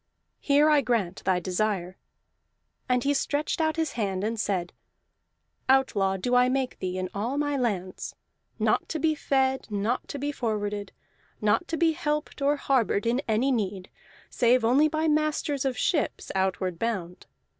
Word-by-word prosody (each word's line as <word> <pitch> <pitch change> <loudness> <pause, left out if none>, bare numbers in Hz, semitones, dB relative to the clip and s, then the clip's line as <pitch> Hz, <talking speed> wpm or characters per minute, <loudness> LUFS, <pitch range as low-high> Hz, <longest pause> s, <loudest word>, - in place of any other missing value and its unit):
Here 290 +1 +4
I 300 -2 +5
grant 220 -8 -1
thy 185 -1 +2
desire." 185 0 -1 0.9
And 250 -1 +2
he 285 +1 +2
stretched 290 +3 -1
out 315 -1 +1
his 320 -1 -1
hand 195 -4 -2
and 225 +1 -2
said: 185 -4 -1 1.0
"Outlaw 205 -8 +3
do 245 +7 -2
I 250 0 +5
make 260 -1 -1
thee 185 0 -3
in 185 0 -2
all 230 +8 -2
my 290 -1 0
lands 200 -8 -2 0.4
not - - +1
to - - -2
be 315 +1 +2
fed, 265 -3 0
not 210 +4 -1
to - - -5
be 285 +1 -2
forwarded, 210 -6 -3 0.5
not 215 +12 +1
to 330 - -2
be 330 -1 +3
helped 300 -3 -3
or 285 +1 +3
harbored 255 -7 +1
in 240 +3 +1
any 230 +5 +2
need, 195 -6 -2 0.4
save 245 0 +3
only 270 +6 +5
by 315 +1 0
masters 300 -2 0
of 260 -2 -1
ships 305 +1 -1
outward 190 -2 -1
bound. 190 -6 -3
245 Hz, 160 wpm, -27 LUFS, 200-285 Hz, 1.0 s, I